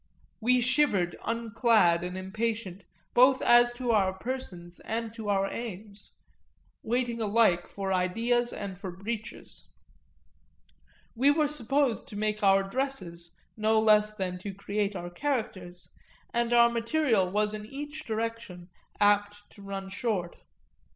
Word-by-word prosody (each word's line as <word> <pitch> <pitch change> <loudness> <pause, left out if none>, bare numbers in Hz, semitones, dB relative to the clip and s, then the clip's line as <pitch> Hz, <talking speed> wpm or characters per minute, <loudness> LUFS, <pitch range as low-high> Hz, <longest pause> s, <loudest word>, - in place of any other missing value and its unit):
We 250 +2 +3
shivered 240 -9 +2
unclad 225 -6 +2
and 180 +1 -4
impatient 195 -1 -4 0.3
both 255 +2 +5
as 240 0 +6
to 245 -1 -2
our 195 -4 +2
persons 190 -6 -6
and 225 0 -4
to 220 -3 -6
our 195 -1 +2
aims, 205 -2 -8 0.7
waiting 235 0 -1
alike 210 -5 +3
for 195 -1 -3
ideas 230 +7 +1
and 200 -2 -6
for 195 -2 -6
breeches; 215 +5 -7 1.4
we 260 +4 +3
were 300 +1 +3
supposed 275 -2 +2
to - - -10
make 215 +1 -1
our 195 -1 +4
dresses 195 -8 -3 0.2
no 220 0 +2
less 215 -1 +4
than 180 -2 -3
to 195 +1 -7
create 200 +1 -2
our 175 -1 -6
characters, 185 -7 -3 0.5
and 235 0 0
our 235 0 +6
material 230 -4 +1
was 210 +2 +1
in 210 0 -6
each 290 +4 -7
direction 220 -5 -5 0.3
apt 205 0 +2
to 200 - -16
run 195 -1 -6
short. 195 -4 -2
215 Hz, 130 wpm, -28 LUFS, 195-235 Hz, 1.4 s, as